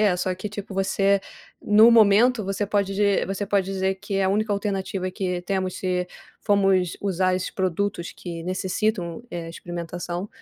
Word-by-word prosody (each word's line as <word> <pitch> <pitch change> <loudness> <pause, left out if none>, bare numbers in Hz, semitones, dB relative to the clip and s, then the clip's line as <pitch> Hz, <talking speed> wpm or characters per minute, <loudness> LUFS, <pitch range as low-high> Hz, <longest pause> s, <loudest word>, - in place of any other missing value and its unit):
é 200 -4 +3
só 185 +1 -1
que, 185 +3 -5
tipo, 205 -1 -7
você, 195 +1 +2 0.4
no 215 +3 +6
momento, 225 +1 +5
você 195 +2 -2
pode 200 -1 0
di 200 0 +2
você 195 +1 -3
pode 200 -1 +2
dizer 190 0 -1
que 200 +1 -4
é 195 - +2
a - - +2
única 210 +2 +1
alternativa 195 -2 -2
que 180 -1 -2
temos 185 0 -2
se 180 -1 -1 0.3
fomos 195 -4 +2
usar 185 -2 +1
esses 185 0 -2
produtos 185 -1 -2
que 170 -2 -7
necessitam, 185 0 -2
eh, 170 -1 -5
experimentação, 175 +2 -5
195 Hz, 165 wpm, -24 LUFS, 180-205 Hz, 0.4 s, no